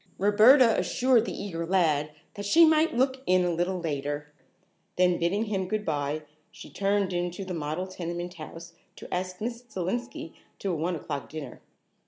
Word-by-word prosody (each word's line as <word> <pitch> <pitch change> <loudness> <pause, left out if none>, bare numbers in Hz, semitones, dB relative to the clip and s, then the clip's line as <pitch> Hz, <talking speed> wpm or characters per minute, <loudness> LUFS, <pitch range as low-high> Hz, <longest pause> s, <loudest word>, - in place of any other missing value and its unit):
Roberta 220 +4 +6
assured 250 -3 +2
the - - -4
eager 170 -5 -4
lad 165 -5 +2 0.2
that 205 -1 -5
she 330 +10 +7
might 315 -2 +3
look 260 +1 +1
in 185 0 +4
a 175 - +1
little 180 +2 -1
later, 145 -2 -4 0.6
then 180 -1 +3
bidding 195 +6 +1
him 195 -3 -2
good 215 +1 -2
bye, 150 0 -2 0.3
she - - -12
turned 200 -1 0
in 175 0 0
to 185 +3 -7
the 185 - -5
model 155 +2 -3
tenement 175 -1 -5
house 165 0 -10 0.2
to - - -9
ask 185 0 -3
Miss 235 +2 -4
Selenski 220 0 -4 0.2
to 195 - -2
a - - -1
one 170 +3 -1
o'clock 145 -2 -5
dinner. 145 -5 -8
185 Hz, 175 wpm, -27 LUFS, 165-210 Hz, 0.6 s, she